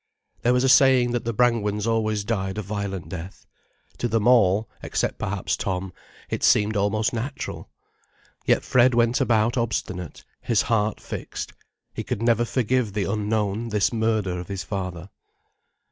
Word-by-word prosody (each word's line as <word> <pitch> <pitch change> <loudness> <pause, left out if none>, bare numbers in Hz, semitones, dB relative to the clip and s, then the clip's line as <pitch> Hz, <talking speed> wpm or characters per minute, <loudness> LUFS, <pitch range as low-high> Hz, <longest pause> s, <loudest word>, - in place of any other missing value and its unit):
There 120 - +3
was 125 +1 +2
a - - +3
saying 130 -2 +5
that 120 -1 -2
the 115 - 0
Brangwens 110 -3 +1
always 110 -2 0
died 95 -3 -2
a 110 - -2
violent 100 -4 -4
death. 90 +2 -8 0.5
To 120 - 0
them 115 -1 +1
all, 110 -4 +4
except - - -2
perhaps 95 0 -1
Tom, 95 -1 -3 0.3
it - - -4
seemed 105 +1 +4
almost 105 +2 +1
natural. 120 +5 -5 0.7
Yet - - +2
Fred 125 0 +4
went 120 +1 +2
about 115 +1 +2
obstinate, 95 -6 -3 0.2
his 115 -4 +1
heart 110 -2 0
fixed. - - -6 0.4
He - - -4
could 110 - -3
never 120 0 +3
forgive 125 -3 0
the 105 -1 0
Unknown 105 +2 -1
this 105 +1 +1
murder 110 -5 0
of 90 - -7
his 100 -1 -4
father. 95 -2 -5
110 Hz, 155 wpm, -24 LUFS, 100-120 Hz, 0.7 s, saying